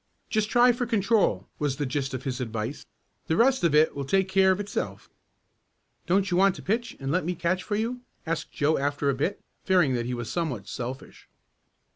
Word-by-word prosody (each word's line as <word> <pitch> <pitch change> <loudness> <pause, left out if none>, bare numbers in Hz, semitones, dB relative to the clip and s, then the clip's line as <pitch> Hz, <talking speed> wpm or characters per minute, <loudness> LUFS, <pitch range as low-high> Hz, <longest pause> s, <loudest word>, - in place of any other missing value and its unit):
"Just 215 -1 +1
try 245 +2 +6
for 245 0 -2
control," 200 - +2
was 145 -3 0
the 145 - -1
gist 135 0 -2
of 130 - -6
his 130 -1 -3
advice. 115 +2 -4 0.4
"The 160 - +1
rest 260 -2 +3
if 165 -3 +3
it 155 +1 +4
will 140 - -3
take 190 +7 +1
care 190 0 +4
of 190 - 0
itself." 205 0 -4 1.0
"Don't 195 +2 +2
you 175 - +2
want 195 0 +4
to - - -10
pitch 230 +5 -2
and 135 0 -3
let 180 +4 +1
me 180 +2 -2
catch 175 +2 0
for 205 - -3
you?" 235 +4 -2 0.2
asked 160 0 -3
Joe 150 +2 +1
after 145 0 0
a - - -1
bit, 150 +10 -1 0.2
fearing 180 -8 +3
that 120 -1 -1
he 125 - -2
was 120 -1 -5
somewhat 130 - -3
selfish. 125 +2 -7
165 Hz, 205 wpm, -26 LUFS, 135-195 Hz, 1.0 s, try